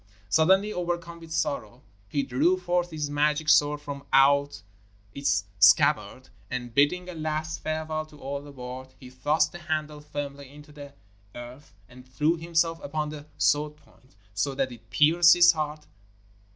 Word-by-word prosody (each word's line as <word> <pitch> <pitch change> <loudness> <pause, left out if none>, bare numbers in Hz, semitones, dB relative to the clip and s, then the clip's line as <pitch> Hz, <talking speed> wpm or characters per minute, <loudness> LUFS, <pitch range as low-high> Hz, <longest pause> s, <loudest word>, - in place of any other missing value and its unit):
Suddenly 190 - +3
overcome 170 -1 -4
with 165 -1 -13
sorrow, 125 -5 -3 0.2
he 140 +6 -1
drew 145 +8 +1
forth 175 -1 -1
his 155 -3 -3
magic 150 +1 0
sword 145 0 +4
from 140 -1 -7
out 140 -2 +3 0.5
its 95 -9 0
scabbard, 130 +6 +4 0.2
and, 120 -2 -5
bidding 145 +7 +2
a 180 - -7
last 155 0 -3
farewell 155 0 -3
to 150 - -16
all 140 +1 -5
the 145 0 -12
world, 130 0 -9
he 125 -1 -12
thrust 145 +5 +1
the 175 - -9
handle 155 -2 -4
firmly 145 -2 -7
into 150 +1 -15
the 145 -1 -12 0.4
earth 120 -1 -11
and 125 +1 -16
threw 150 +6 +1
himself 165 0 -1
upon 150 +1 -3
the 150 -1 -9
sword 150 +1 +1
point, 130 -5 -26 0.2
so 105 +7 -1
that 135 -1 -1
it 120 -2 -14
pierced 170 +3 +5
his 175 0 +7
heart. 155 -1 -4
150 Hz, 160 wpm, -26 LUFS, 135-160 Hz, 0.5 s, his